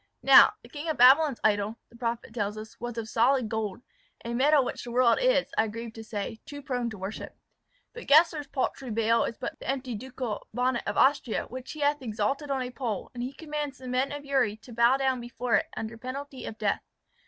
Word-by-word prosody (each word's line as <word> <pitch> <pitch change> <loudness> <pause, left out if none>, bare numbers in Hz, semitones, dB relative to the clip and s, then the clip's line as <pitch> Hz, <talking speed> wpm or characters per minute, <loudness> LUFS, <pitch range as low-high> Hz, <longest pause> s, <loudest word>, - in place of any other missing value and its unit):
Now, - - +8
the - - -14
King 300 +2 -6
of 315 - -1
Babylon's 265 +2 +6
idol, 210 +1 +1
the - - -19
prophet 235 -1 -4
tells 210 -2 -2
us, 220 +1 -10
was 240 0 -5
of 225 -1 -3
solid 245 +2 +2
gold, 220 0 -3 0.4
a 235 - -3
metal 275 +2 +4
which - - -5
the 245 - -7
world 240 -1 +3
is, - - +3
I 220 - +3
grieve 230 +1 -7
to 225 - -9
say, 220 0 -5
too 285 -1 -9
prone 245 -4 -2
to 220 - -8
worship; 190 +3 -7 0.6
but 475 - -10
Gessler's 305 0 +5
paltry 265 -1 -3
Baal 230 +1 +2
is 230 - -5
but 315 -3 -6
the - - -7
empty 265 -2 -2
ducal 245 -1 -5
bonnet 250 0 0
of - - -2
Austria, 265 -4 +2
which 255 +1 -8
he 310 - -8
hath 290 0 +2
exalted 240 +5 -2
on 270 -2 0
a 250 - -6
pole; 235 -6 -4
and 245 - -6
he 250 +2 -3
commands 295 -2 -5
the 255 0 -10
men 255 +2 0
of 290 0 -6
Uri 265 -7 +1
to 235 +2 -13
bow 235 +3 +4
down 265 -2 0
before 240 0 -4
it, - - -2
under 225 +1 -5
penalty 265 +2 -6
of 220 - -7
death. 210 -2 0
250 Hz, 220 wpm, -28 LUFS, 225-275 Hz, 0.6 s, Now